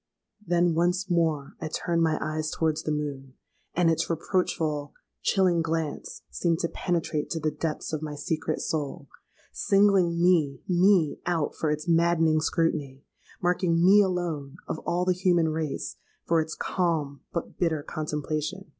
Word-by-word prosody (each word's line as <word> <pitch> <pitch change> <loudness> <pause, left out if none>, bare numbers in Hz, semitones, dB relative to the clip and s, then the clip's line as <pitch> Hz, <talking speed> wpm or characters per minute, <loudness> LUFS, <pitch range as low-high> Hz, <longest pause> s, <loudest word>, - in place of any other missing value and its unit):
Then 175 -2 +2
once 180 +3 +1
more 160 -5 +1
I 160 - -2
turned 170 +2 -1
my 160 -1 +2
eyes 155 0 -2
towards 160 -1 0
the 155 - -2
moon; 140 -3 -4 0.4
and 175 -1 +3
its 165 0 +1
reproachful, 160 -4 -1 0.3
chilling 180 -3 +3
glance 160 -2 -3
seemed 170 -2 0
to 170 - +1
penetrate 165 -4 -2
to 165 - -2
the 155 0 0
depths 160 0 -4
of 155 - -2
my 150 -1 -5
secret 155 +1 -2
soul,—singling 170 +5 0
me, 165 -7 +3
me 180 -3 +3
out 165 -4 0
for 155 - -1
its 150 +2 -2
maddening 165 -2 +3
scrutiny,—marking 165 +3 -1
me 200 +3 +7
alone, 170 -7 -2
of 155 - -3
all 175 +1 +1
the 185 - +3
human 175 -3 +2
race, 155 -2 -3 0.3
for 165 -1 +3
its 160 0 -5
calm, 155 -7 -1
but 170 - -5
bitter 160 -4 +1
contemplation. 155 +4 -4
165 Hz, 145 wpm, -27 LUFS, 155-175 Hz, 0.4 s, me